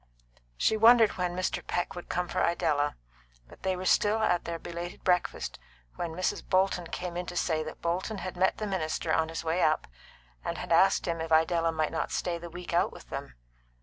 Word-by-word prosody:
She 220 Hz, -, +2 dB
wondered 225 Hz, 0 st, +7 dB
when 180 Hz, -1 st, -1 dB
Mr. 185 Hz, 0 st, -1 dB
Peck 175 Hz, -, -1 dB
would 175 Hz, -, -9 dB
come 180 Hz, 0 st, -1 dB
for -, -, -1 dB
Idella, 150 Hz, -4 st, +1 dB, 0.5 s
but -, -, -16 dB
they 190 Hz, -1 st, 0 dB
were 185 Hz, +1 st, -5 dB
still 210 Hz, +3 st, +4 dB
at 215 Hz, -5 st, +1 dB
their 170 Hz, 0 st, -3 dB
belated 170 Hz, +1 st, -7 dB
breakfast 180 Hz, -1 st, 0 dB, 0.4 s
when 170 Hz, -2 st, -4 dB
Mrs. 185 Hz, +1 st, -1 dB
Bolton 185 Hz, -2 st, +1 dB
came 175 Hz, 0 st, -5 dB
in 180 Hz, 0 st, -3 dB
to 175 Hz, -, -6 dB
say 160 Hz, -2 st, +1 dB
that 155 Hz, 0 st, -8 dB
Bolton 185 Hz, +5 st, -1 dB
had 185 Hz, 0 st, -5 dB
met 185 Hz, +1 st, +2 dB
the 215 Hz, -, -3 dB
minister 185 Hz, -6 st, -1 dB
on 160 Hz, 0 st, +2 dB
his 165 Hz, -, -4 dB
way 165 Hz, +2 st, 0 dB
up, 155 Hz, 0 st, +2 dB, 0.6 s
and -, -, -3 dB
had -, -, -6 dB
asked -, -, +4 dB
him 165 Hz, -1 st, -1 dB
if 165 Hz, 0 st, -5 dB
Idella 165 Hz, +1 st, +3 dB
might 155 Hz, -1 st, -1 dB
not -, -, -2 dB
stay 170 Hz, -2 st, -1 dB
the 170 Hz, 0 st, -8 dB
week 175 Hz, +1 st, -7 dB
out 175 Hz, -, +3 dB
with -, -, -14 dB
them. -, -, -6 dB
175 Hz, 210 wpm, -29 LUFS, 165-185 Hz, 0.6 s, wondered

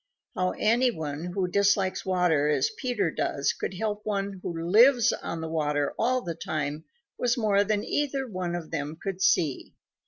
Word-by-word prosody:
How 185 Hz, 0 st, 0 dB
any 240 Hz, +4 st, +3 dB
one 155 Hz, -6 st, -4 dB
who 180 Hz, +1 st, -1 dB
dislikes 200 Hz, 0 st, +2 dB
water 175 Hz, -6 st, +2 dB
as 150 Hz, -, +1 dB
Peter 225 Hz, -, -1 dB
does 140 Hz, -2 st, 0 dB
could 190 Hz, -, -5 dB
help 210 Hz, +1 st, -2 dB
one 200 Hz, -2 st, -2 dB
who -, -, -4 dB, 0.2 s
lives 235 Hz, +5 st, +6 dB
on 165 Hz, -, -5 dB
the 160 Hz, -, -4 dB
water 150 Hz, -2 st, 0 dB
all 255 Hz, +2 st, +1 dB
the 170 Hz, -, -3 dB
time 155 Hz, -1 st, -4 dB, 0.3 s
was 245 Hz, +1 st, +1 dB
more 205 Hz, -3 st, +3 dB
than 210 Hz, 0 st, 0 dB
either 275 Hz, -2 st, -1 dB
one 185 Hz, -5 st, -3 dB
of 170 Hz, -3 st, -6 dB
them 155 Hz, 0 st, -3 dB
could 190 Hz, -1 st, -5 dB
see. 155 Hz, -7 st, +1 dB
185 Hz, 175 wpm, -27 LUFS, 160-215 Hz, 0.3 s, lives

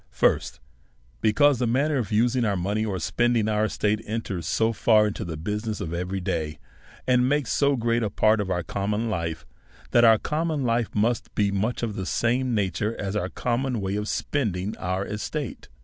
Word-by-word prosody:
First, -, -, +1 dB, 0.6 s
Because 140 Hz, +4 st, +4 dB
the 125 Hz, -, +1 dB
manner 140 Hz, +5 st, +1 dB
of 115 Hz, -5 st, -2 dB
using 120 Hz, +3 st, +2 dB
our 105 Hz, -3 st, +1 dB
money, 100 Hz, +5 st, -1 dB
or 100 Hz, -4 st, -2 dB
spending 115 Hz, +6 st, +1 dB
our 105 Hz, 0 st, +2 dB
estate, 105 Hz, 0 st, 0 dB
enters 100 Hz, -7 st, -3 dB
so 110 Hz, +6 st, +1 dB
far 110 Hz, -1 st, +4 dB
into 105 Hz, -, -3 dB
the 80 Hz, -3 st, -5 dB
business 105 Hz, +5 st, -3 dB
of 80 Hz, -, -4 dB
every 90 Hz, +3 st, -2 dB
day, 80 Hz, -4 st, -2 dB, 0.5 s
and 125 Hz, 0 st, +3 dB
makes 145 Hz, -3 st, 0 dB
so 140 Hz, -1 st, +3 dB
great 115 Hz, -1 st, +1 dB
a 105 Hz, -, 0 dB
part 110 Hz, +2 st, +3 dB
of 100 Hz, -, -4 dB
our 90 Hz, -2 st, -1 dB
common 105 Hz, +6 st, -2 dB
life, 85 Hz, -4 st, -3 dB, 0.5 s
that 120 Hz, -, +5 dB
our 115 Hz, -1 st, +7 dB
common 155 Hz, +2 st, -1 dB
life 115 Hz, -2 st, +1 dB
must 115 Hz, +2 st, 0 dB
be 100 Hz, -1 st, +2 dB
much 110 Hz, +5 st, -1 dB
of 110 Hz, -3 st, -2 dB
the 95 Hz, -1 st, -4 dB
same 125 Hz, +1 st, +1 dB
nature 105 Hz, +2 st, -1 dB
as 100 Hz, 0 st, -3 dB
our 95 Hz, -3 st, -1 dB
common 125 Hz, +2 st, -1 dB
way 95 Hz, 0 st, -2 dB
of 105 Hz, +1 st, -2 dB
spending 105 Hz, -8 st, -1 dB
our 95 Hz, +2 st, -2 dB
estate. 110 Hz, +7 st, -5 dB
110 Hz, 190 wpm, -25 LUFS, 100-120 Hz, 0.6 s, our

